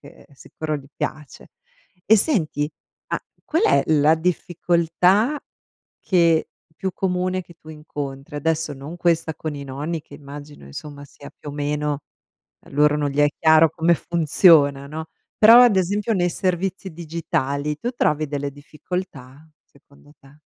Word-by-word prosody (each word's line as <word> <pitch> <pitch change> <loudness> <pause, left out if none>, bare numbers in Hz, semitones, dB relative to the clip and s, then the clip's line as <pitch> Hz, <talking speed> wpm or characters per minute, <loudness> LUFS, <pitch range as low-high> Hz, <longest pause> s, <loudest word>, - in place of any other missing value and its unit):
che 140 - -16
sicuro 155 +3 -6
gli 135 - -11
piace. 150 -2 -6 0.5
E 220 - +6
senti, 160 - 0 0.4
ma - - -1 0.2
qual 325 +6 0
è - - +4
la 155 +1 +4
difficoltà 180 - +1 0.6
che 170 -4 +2 0.3
più 190 +3 -3
comune 185 0 -1
che 170 0 -17
tu 155 - -16
incontri? 145 -2 -7
Adesso 160 +1 -1
non 145 +5 -9
questa 165 -2 0
con 155 0 -5
i 140 - -7
nonni, 145 +5 -4
che - - -15
immagino 145 - -11
insomma 145 - -9
sia 140 +1 -13
più 145 - -10
o - - -9
meno 145 0 -2 0.6
a - - -21
loro 150 +1 +3
non 145 -1 -1
gli 140 - -6
è 145 - +6
chiaro 160 0 +6
come 170 0 +2
funziona, 155 -4 +4
no; 160 +2 -7 0.3
però 230 +3 +9
ad 230 -6 +5
esempio 205 +4 0
nei 175 -2 +1
servizi 190 +1 -2
digitali 150 -3 -2
tu 240 +9 -3
trovi 155 - 0
delle 145 0 -3
difficoltà, 145 -1 -8 0.2
secondo 140 +1 -22
te? 140 +2 -20
155 Hz, 150 wpm, -22 LUFS, 145-175 Hz, 0.6 s, però